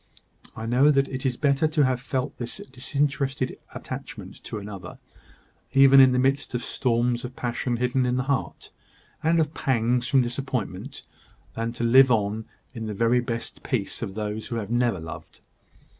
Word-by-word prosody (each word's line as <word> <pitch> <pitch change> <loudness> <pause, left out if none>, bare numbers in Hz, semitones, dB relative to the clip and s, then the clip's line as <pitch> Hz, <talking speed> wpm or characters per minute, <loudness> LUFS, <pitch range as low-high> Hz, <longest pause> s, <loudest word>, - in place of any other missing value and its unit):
I 110 - -6
know 125 +5 +4
that 135 -2 +3
it 130 0 -2
is 125 - -2
better 145 +1 +2
to 150 -2 +2
have 130 -1 0
felt 130 0 -3
this 120 -1 -3
disinterested 140 0 -1 0.2
attachment - - -8
to - - -5
another, 100 -2 -8 0.8
even 135 0 +7
in 130 -1 +8
the 125 - +1
midst 135 +1 +1
of 120 - -2
storms 120 -1 0
of 125 +1 -7
passion 120 0 -2
hidden 125 +1 +1
in 125 - +1
the 130 - 0
heart, 135 -1 -3 0.5
and 165 +1 +3
of 155 -1 0
pangs 125 -2 +1
from 135 -2 +4
disappointment, 125 -1 -4 0.5
than 115 +1 -2
to 120 - -4
live 130 +3 +7
on 110 -1 0 0.3
in 115 -3 -5
the 105 - -4
very 115 +4 +3
best 120 -1 -4
peace - - -2
of 95 - -5
those 105 0 -4
who 115 - -4
have 110 -2 -4
never 120 -5 +1
loved. 80 0 -9
125 Hz, 175 wpm, -25 LUFS, 115-135 Hz, 0.8 s, in